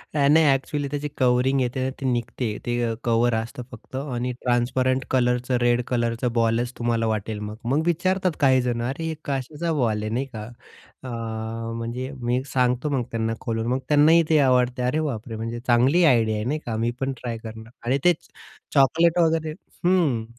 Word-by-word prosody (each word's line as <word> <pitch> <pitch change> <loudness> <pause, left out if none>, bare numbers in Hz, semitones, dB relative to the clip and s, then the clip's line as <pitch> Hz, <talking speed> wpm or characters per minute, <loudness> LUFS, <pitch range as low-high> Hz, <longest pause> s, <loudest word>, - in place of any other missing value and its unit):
नाही, 150 +2 +5
एक्चुअली 145 +1 -3
त्याची 145 +1 -3
कवरिंग 130 +1 +3
येते 125 +1 -1
ना, 130 - 0
ती - - -3
निघते. 120 -1 -1 0.2
ते 120 -1 0
कव्हर 120 0 +2
असतं 115 +2 -4
फक्त 125 +2 -12
आणि 125 -3 -2
ट्रान्सपरंट 130 +2 +1
कलरचं, 125 0 +1
रेड 120 0 +3
कलरचं 120 0 0
बॉलच 115 +1 +1
तुम्हाला 115 -1 0
वाटेल 110 0 -2
मग. 105 0 -6
मग 135 +6 +2
विचारतात 185 +2 +1
काही 130 -2 +4
जण, 120 -1 -1
"अरे, 140 +5 -4
हे 160 0 -2
कशाचा 145 +5 -2
बॉल 115 -7 0
आहे?" 110 - -3
नाही 130 +4 -1
का, 105 - -5 0.6
अ, 130 - -6 0.7
म्हणजे 120 +3 -4
मी 120 +1 0
सांगतो 125 +2 +1
मग 135 -4 0
त्यांना 115 0 -1
खोलून, 115 -1 -2
मग 130 +2 +1
त्यांनाही 155 +3 +6
ते 155 -1 +5
आवडते. 125 -2 +2
"अरे 130 +5 +1
बापरे! 120 -6 -4
म्हणजे 115 +2 -4
चांगली 130 +8 +4
आयडिया 115 -7 +3
आहे, 105 - -2
नाही 150 +4 -1
का? 115 - -3
मी 115 +2 0
पण 135 0 -1
ट्राय 115 -2 -4
करणार." 110 +1 -9
आणि 130 +3 +2
तेच. 175 -3 +2 0.5
चॉकलेट 160 +5 +4
वगैरे 160 -1 +1 0.3
हं. 160 -11 +2
125 Hz, 175 wpm, -24 LUFS, 120-140 Hz, 0.7 s, त्यांनाही